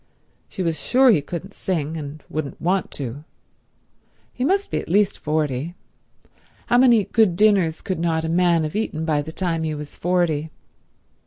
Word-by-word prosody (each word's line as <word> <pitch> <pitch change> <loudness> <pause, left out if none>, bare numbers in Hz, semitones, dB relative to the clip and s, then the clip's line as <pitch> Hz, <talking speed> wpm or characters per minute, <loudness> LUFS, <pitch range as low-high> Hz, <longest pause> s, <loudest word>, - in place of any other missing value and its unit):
She 190 - -4
was 165 -3 -1
sure 255 - +4
he 160 - +3
couldn't 175 +6 -7
sing, 160 -4 -2
and 150 -1 -7
wouldn't 150 -2 -5
want 185 +3 0
to. 135 +1 -6 1.1
He 250 - -3
must 390 +8 +1
be - - 0
at - - -8
least 200 +3 +2
forty. 150 +1 -2 0.9
How 245 - +3
many 240 -4 +5
good 215 -7 +2
dinners 195 -5 +3
could 185 -3 -3
not 165 -1 0
a - - -2
man 170 -1 +3
have 155 +3 -4
eaten 160 -7 -2
by 150 -2 +1
the 155 +2 -7
time 165 -1 -1
he 155 -1 -2
was 150 0 -8
forty? 170 -4 0
165 Hz, 170 wpm, -22 LUFS, 155-195 Hz, 1.1 s, many